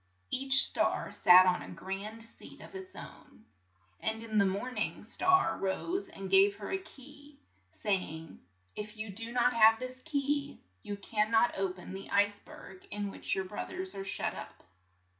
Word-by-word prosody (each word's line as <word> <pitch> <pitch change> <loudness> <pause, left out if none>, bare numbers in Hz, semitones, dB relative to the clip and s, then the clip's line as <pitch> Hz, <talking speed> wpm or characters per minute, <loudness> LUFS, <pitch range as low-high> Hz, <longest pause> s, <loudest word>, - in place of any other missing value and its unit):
Each 265 0 +4
star - - +1
sat 180 +1 +7
on 180 -1 +2
a - - -9
grand 195 +6 -6
seat 230 - -10
of - - -12
its 380 -1 -9
own, 220 - -12 0.5
and 220 -1 0
the - - +4
morn 205 +7 -3
ing - - -1
star 370 +1 +3
rose 350 - -2
and 195 -12 -7
gave 195 +1 +5
her 205 -1 -7
a 385 - 0
key, 290 -3 -15 0.3
say 190 - 0
ing, 160 -3 -8 0.4
"If 210 +1 -7
you 215 -1 -5
do 225 +4 -4
not 250 0 +2
have 225 -1 +6
this 255 +2 -6
key, 285 -1 -2 0.2
you 205 - -5
can 210 +1 0
not 230 +1 +3
o 195 -1 0
pen 185 0 -10
the 195 +1 -8
ice 205 0 +2
berg 190 -1 -13
in 205 -1 -3
which - - -3
your 190 - -2
broth 195 +3 -6
ers 375 0 -4
are 195 - -5
shut 195 - 0
up." - - -10
215 Hz, 180 wpm, -31 LUFS, 195-265 Hz, 0.5 s, sat